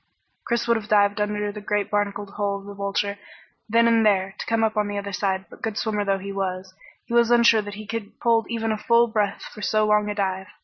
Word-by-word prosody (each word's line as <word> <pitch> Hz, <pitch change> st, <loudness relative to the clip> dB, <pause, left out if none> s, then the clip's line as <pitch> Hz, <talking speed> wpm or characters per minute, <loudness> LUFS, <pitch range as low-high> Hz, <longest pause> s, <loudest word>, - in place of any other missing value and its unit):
Chris 235 Hz, 0 st, -1 dB
would 235 Hz, -1 st, +3 dB
have 215 Hz, -1 st, -7 dB
dived 205 Hz, 0 st, +3 dB
under 210 Hz, 0 st, -1 dB
the 210 Hz, 0 st, -8 dB
great 205 Hz, 0 st, -1 dB
barnacled 205 Hz, -1 st, -1 dB
hull 200 Hz, -1 st, -1 dB
of 200 Hz, -, -12 dB
the 205 Hz, -, -8 dB
Vulture 200 Hz, 0 st, -2 dB, 0.5 s
then 230 Hz, +1 st, +4 dB
and 230 Hz, -1 st, +4 dB
there, 195 Hz, -2 st, +2 dB
to -, -, -4 dB
come 225 Hz, 0 st, +1 dB
up 220 Hz, 0 st, +1 dB
on 210 Hz, -1 st, +1 dB
the 205 Hz, 0 st, -4 dB
other 200 Hz, 0 st, -5 dB
side, 190 Hz, 0 st, -1 dB
but -, -, -15 dB
good 220 Hz, -2 st, -3 dB
swimmer 210 Hz, -2 st, -1 dB
though 195 Hz, -1 st, +1 dB
he 195 Hz, +1 st, -6 dB
was, 190 Hz, -1 st, -4 dB, 0.3 s
he -, -, -7 dB
was 235 Hz, -1 st, +4 dB
unsure 235 Hz, -2 st, +5 dB
that 205 Hz, -1 st, -8 dB
he 215 Hz, +1 st, -8 dB
could 215 Hz, 0 st, -5 dB
hold 230 Hz, -1 st, +2 dB
even 225 Hz, -1 st, -1 dB
a 215 Hz, -, -2 dB
full 235 Hz, +2 st, +4 dB
breath 215 Hz, -3 st, -1 dB
for 210 Hz, -, -10 dB
so 215 Hz, +1 st, +2 dB
long 210 Hz, 0 st, +2 dB
a 205 Hz, -, -3 dB
dive. 190 Hz, -2 st, -2 dB
210 Hz, 250 wpm, -24 LUFS, 200-225 Hz, 0.5 s, unsure